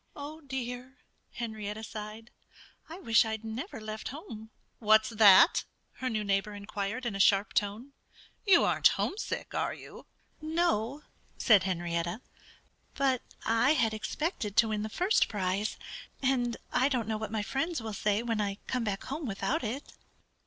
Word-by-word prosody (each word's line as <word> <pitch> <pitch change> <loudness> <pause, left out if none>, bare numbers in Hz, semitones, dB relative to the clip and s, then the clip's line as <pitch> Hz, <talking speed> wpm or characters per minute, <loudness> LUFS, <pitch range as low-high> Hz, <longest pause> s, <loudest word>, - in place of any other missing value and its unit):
"Oh, 300 +2 -8
dear!" 260 -1 -6 0.4
Henrietta 220 -2 -5
sighed. 215 +2 -8 0.6
"I 330 - -7
wish 230 -12 +4
I'd 220 -1 -4
never 225 - -5
left 215 0 -6
home." 230 -6 -8 0.3
"What's 215 0 +5
that?" 210 - +7 0.3
her 260 - -2
neighbor 205 -2 -1
inquired 205 +4 -4
in 235 - -1
a - - -4
sharp 195 +1 +4
tone. 215 +7 -1 0.5
"You 385 -5 +6
aren't - - +5
homesick, 420 - -3
are - - -1
you?" - - -12 0.3
"N 310 +1 -5
no!" 290 -5 +1 0.3
said 205 -6 +5
Henrietta. 175 +2 -2 0.7
"But 265 -2 +2 0.2
I 230 +5 +4
had 230 -6 +2
expected 220 - -3
to 225 -1 +5
win 215 -1 -1
the 215 - -3
first 365 - +2
prize. 200 0 -1 0.4
And 245 -3 +1 0.2
I 260 +2 +3
don't 245 -6 -1
know 220 -1 -1
what 215 -1 -4
my 220 -2 -1
friends 310 - -1
will 220 -2 -5
say 210 +2 0
when 230 -3 0
I 200 -1 -2
come 250 -2 -1
back 200 -3 -2
home 290 +1 -4
without 230 +9 -1
it." 245 +6 -5
225 Hz, 155 wpm, -30 LUFS, 210-265 Hz, 0.7 s, that